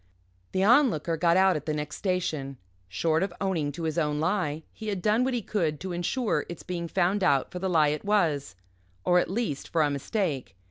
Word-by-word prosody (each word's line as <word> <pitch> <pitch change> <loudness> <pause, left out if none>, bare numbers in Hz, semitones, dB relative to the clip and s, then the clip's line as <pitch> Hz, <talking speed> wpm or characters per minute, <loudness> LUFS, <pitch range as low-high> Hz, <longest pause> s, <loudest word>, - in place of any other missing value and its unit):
The 190 - +1
Onlooker 210 - +4
got 170 +2 +3
out 190 0 +5
at 150 0 -5
the 155 - 0
next 150 0 -4
station. 160 -8 -2 0.3
Short 160 - +1
of 195 - -1
owning 170 -7 -1
to 165 - -6
his 160 +1 0
own 150 -2 0
lie, 160 -3 -1
he 220 - -8
had 200 -3 -1
done 215 +6 +2
what 260 0 0
he 235 - -2
could 165 -9 -1
to 190 - -4
insure 190 +8 0
its 170 - -7
being 170 -2 -4
found 185 +3 +1
out 140 -5 +2
for 180 - -5
the 190 +1 -1
lie 155 -4 +4
it 150 +1 -3
was 160 - +1 0.5
or, 180 0 +5
at 175 - -1
least, 195 - -2
for 165 -2 +2
a 145 - +1
mistake. 140 - -2
170 Hz, 215 wpm, -27 LUFS, 150-195 Hz, 0.5 s, out